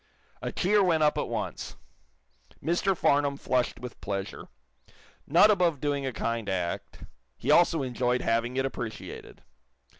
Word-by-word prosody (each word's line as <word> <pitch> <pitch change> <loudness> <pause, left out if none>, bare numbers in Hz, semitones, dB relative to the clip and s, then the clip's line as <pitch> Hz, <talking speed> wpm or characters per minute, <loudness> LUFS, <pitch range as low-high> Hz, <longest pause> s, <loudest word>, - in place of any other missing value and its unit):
'" - - -35
A - - -3
cheer 200 +2 +3
went 165 -4 +3
up 150 - +3
at - - -2
once. - - -4 0.8
Mr. 175 +3 0
Farnum 140 -1 +2
flushed 125 -3 0
with 125 -1 -9
pleasure. 100 -1 -4 0.8
Not 175 +8 +6
above 175 -7 +2
doing 140 -1 -1
a - - -1
kind 115 -2 -3
act, 90 -3 -3 0.3
he - - 0
also 165 -4 +4
enjoyed 125 0 0
having 115 +2 0
it 135 - +1
appreciated. 115 -4 -7
135 Hz, 145 wpm, -28 LUFS, 120-165 Hz, 0.8 s, Not